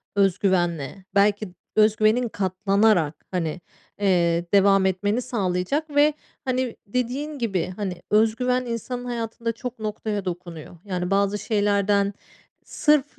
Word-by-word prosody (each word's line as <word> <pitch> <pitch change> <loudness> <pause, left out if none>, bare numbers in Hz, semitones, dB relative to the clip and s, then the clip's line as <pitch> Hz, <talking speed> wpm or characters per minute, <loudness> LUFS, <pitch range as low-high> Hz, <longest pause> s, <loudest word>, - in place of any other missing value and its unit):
öz 195 -2 +3
güvenle, 175 -3 0
belki 205 0 +3 0.3
öz 215 0 +5
güvenin 220 +3 +2
katlanarak, 195 -4 +1
hani, 175 -2 -2 0.4
eee, 175 -3 +2
devam 195 -1 +5
etmeni 205 +5 0
sağlayacak 225 - -1
ve, 295 +1 +5 0.3
hani, 255 -2 -1
dediğin 255 +6 -2
gibi, 195 -6 -1
hani, 190 -4 -4
öz 220 +1 +4
güven 250 +1 0
insanın 245 +1 -4
hayatında 230 -1 -3
çok 235 +1 -7
noktaya 210 -1 -3
dokunuyor. 175 -2 -7
Yani, 180 -2 -3
bazı 200 +1 +2
şeylerden 205 -2 +1 0.5
sırf 300 -3 +2
205 Hz, 125 wpm, -24 LUFS, 185-235 Hz, 0.5 s, öz